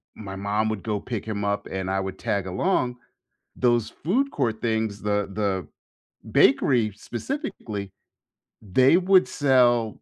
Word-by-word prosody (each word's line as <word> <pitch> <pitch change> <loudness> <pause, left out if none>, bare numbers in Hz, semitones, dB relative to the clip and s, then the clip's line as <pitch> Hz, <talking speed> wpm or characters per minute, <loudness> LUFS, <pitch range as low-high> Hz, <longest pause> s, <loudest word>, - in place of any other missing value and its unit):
my 95 -3 -8
mom 105 +2 0
would 110 -3 -3
go 105 -3 -2
pick 115 -2 -5
him 105 -2 -3
up 100 0 -1
and 95 0 -3
I 95 0 0
would 95 0 -4
tag 100 -5 -2
along, 125 - 0 0.6
those 120 -3 +2
food 255 - 0
court 110 - -2
things, 110 -3 -1
the 105 -1 0
the 95 -6 -1 0.7
bakery 125 -5 +4 0.2
specifically, 115 - -4 0.7
they 130 - +4
would 185 0 +4
sell 125 -5 +3
110 Hz, 140 wpm, -25 LUFS, 100-125 Hz, 0.7 s, bakery